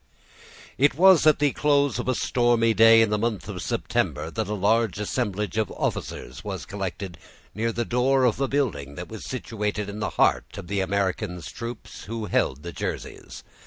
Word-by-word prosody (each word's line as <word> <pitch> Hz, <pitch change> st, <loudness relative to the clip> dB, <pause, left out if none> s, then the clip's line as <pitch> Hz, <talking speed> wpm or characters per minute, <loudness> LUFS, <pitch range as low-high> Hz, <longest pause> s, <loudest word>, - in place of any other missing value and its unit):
It 145 Hz, +1 st, +4 dB
was 185 Hz, 0 st, +6 dB
at 155 Hz, -, +6 dB
the 145 Hz, -1 st, +2 dB
close 140 Hz, -4 st, +2 dB
of 120 Hz, -, -4 dB
a 130 Hz, -, +1 dB
stormy 120 Hz, -2 st, +2 dB
day 115 Hz, +1 st, +7 dB
in 110 Hz, -, 0 dB
the 105 Hz, -, +1 dB
month 110 Hz, -3 st, -2 dB
of -, -, -5 dB
September, 75 Hz, +2 st, -1 dB
that 110 Hz, 0 st, -2 dB
a 105 Hz, -, -2 dB
large 105 Hz, 0 st, +2 dB
assemblage 105 Hz, -2 st, -2 dB
of 110 Hz, -, 0 dB
officers -, -, -4 dB
was -, -, -5 dB
collected 95 Hz, -2 st, -5 dB, 0.3 s
near 115 Hz, +3 st, -1 dB
the 120 Hz, +1 st, -2 dB
door 130 Hz, +3 st, +2 dB
of 125 Hz, +1 st, +2 dB
a 135 Hz, -, +2 dB
building 85 Hz, -, -1 dB
that 90 Hz, -, -7 dB
was 110 Hz, -, -8 dB
situated 105 Hz, -4 st, -3 dB
in 105 Hz, +1 st, -6 dB
the 105 Hz, -, -1 dB
heart -, -, +2 dB
of -, -, -7 dB
the 100 Hz, -1 st, 0 dB
Americans 95 Hz, -2 st, -2 dB
troops, 115 Hz, -1 st, -8 dB
who 115 Hz, 0 st, -4 dB
held 70 Hz, -7 st, 0 dB
the 85 Hz, -, -5 dB
Jerseys. -, -, -6 dB
110 Hz, 185 wpm, -25 LUFS, 100-120 Hz, 0.3 s, day